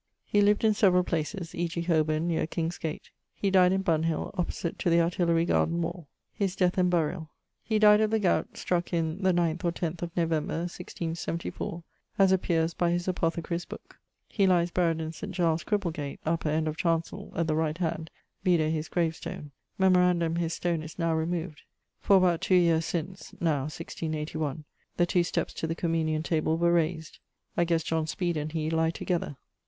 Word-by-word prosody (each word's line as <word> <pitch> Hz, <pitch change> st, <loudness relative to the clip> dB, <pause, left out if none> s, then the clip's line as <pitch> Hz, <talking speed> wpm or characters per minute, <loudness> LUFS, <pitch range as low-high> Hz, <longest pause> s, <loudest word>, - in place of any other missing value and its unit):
_> -, -, -56 dB, 0.2 s
He 205 Hz, -, +2 dB
lived 205 Hz, +1 st, +3 dB
in 220 Hz, -1 st, +5 dB
several 185 Hz, -4 st, +4 dB
places, 165 Hz, +1 st, -3 dB
e.g. 170 Hz, 0 st, -2 dB
Holborne 160 Hz, -1 st, +1 dB
neer 165 Hz, -2 st, 0 dB
King's 165 Hz, +1 st, -3 dB
gate. 160 Hz, -1 st, -5 dB, 0.2 s
He 200 Hz, -, 0 dB
died 185 Hz, -1 st, +5 dB
in 190 Hz, 0 st, +1 dB
Bunhill, 165 Hz, -2 st, 0 dB
opposite 175 Hz, -2 st, -3 dB
to -, -, +1 dB
the 170 Hz, 0 st, +4 dB
Artillery 170 Hz, 0 st, +2 dB
garden 170 Hz, 0 st, +1 dB
wall. 170 Hz, -1 st, -4 dB, 0.3 s
<_His 195 Hz, -2 st, 0 dB
death 180 Hz, 0 st, +2 dB
and 180 Hz, 0 st, +3 dB
burial._> 165 Hz, -1 st, 0 dB, 0.3 s
He 220 Hz, -, 0 dB
died 210 Hz, 0 st, +6 dB
of 215 Hz, -, +2 dB
the 220 Hz, -, +2 dB
gowt 200 Hz, -4 st, 0 dB
struck 175 Hz, 0 st, -1 dB
in, 165 Hz, +2 st, -1 dB
the 190 Hz, -1 st, +3 dB
9th 170 Hz, -1 st, 0 dB
or 170 Hz, -, +2 dB
10th 170 Hz, 0 st, -4 dB
of 170 Hz, 0 st, -6 dB
November, 165 Hz, -1 st, 0 dB
1674, 170 Hz, -1 st, -5 dB, 0.3 s
as 195 Hz, -2 st, +5 dB
appeares 170 Hz, -3 st, +1 dB
by 175 Hz, -, +1 dB
his 175 Hz, +1 st, 0 dB
apothecarye's 170 Hz, -1 st, -1 dB
booke. -, -, -11 dB, 0.3 s
He 195 Hz, -3 st, +2 dB
lies 175 Hz, -2 st, +3 dB
buried 165 Hz, -3 st, +1 dB
in 160 Hz, 0 st, -4 dB
St. 195 Hz, +4 st, -7 dB
Giles's 170 Hz, -2 st, +1 dB
Cripplegate, 165 Hz, -9 st, -2 dB
upper 160 Hz, -1 st, 0 dB
end 155 Hz, +1 st, 0 dB
of 155 Hz, 0 st, -3 dB
chancell 165 Hz, +4 st, -1 dB
at 170 Hz, -, +1 dB
the 160 Hz, -, 0 dB
right 160 Hz, 0 st, 0 dB
hand, 160 Hz, -2 st, -2 dB, 0.3 s
vide 170 Hz, -5 st, +3 dB
his 155 Hz, 0 st, -3 dB
gravestone. 160 Hz, -3 st, -3 dB, 0.3 s
Memorandum 180 Hz, -3 st, +3 dB
his 165 Hz, -1 st, -1 dB
stone 170 Hz, -2 st, -1 dB
is 155 Hz, 0 st, -9 dB
now 165 Hz, -2 st, +1 dB
removed; 160 Hz, -1 st, -2 dB, 0.4 s
for, 200 Hz, -, +5 dB
about 180 Hz, -3 st, +3 dB
two 185 Hz, -, +3 dB
yeares 165 Hz, -2 st, +4 dB
since 175 Hz, +3 st, -5 dB
(now, 150 Hz, -5 st, +1 dB
1681), 155 Hz, -1 st, -4 dB, 0.3 s
the 175 Hz, -, +4 dB
two 175 Hz, 0 st, +2 dB
steppes 170 Hz, -, -2 dB
to 160 Hz, -, -3 dB
the 165 Hz, -, -2 dB
communion 160 Hz, -2 st, 0 dB
table 160 Hz, -1 st, 0 dB
were 170 Hz, +1 st, +3 dB
raysed. 160 Hz, -1 st, -1 dB, 0.4 s
I 175 Hz, -, +2 dB
ghesse 165 Hz, -1 st, +1 dB
John 160 Hz, -1 st, -1 dB
Speed 175 Hz, +1 st, -1 dB
and 155 Hz, 0 st, -3 dB
he 160 Hz, -1 st, -2 dB
lie 160 Hz, 0 st, +2 dB
together. 165 Hz, -4 st, -3 dB
170 Hz, 190 wpm, -28 LUFS, 160-180 Hz, 0.4 s, died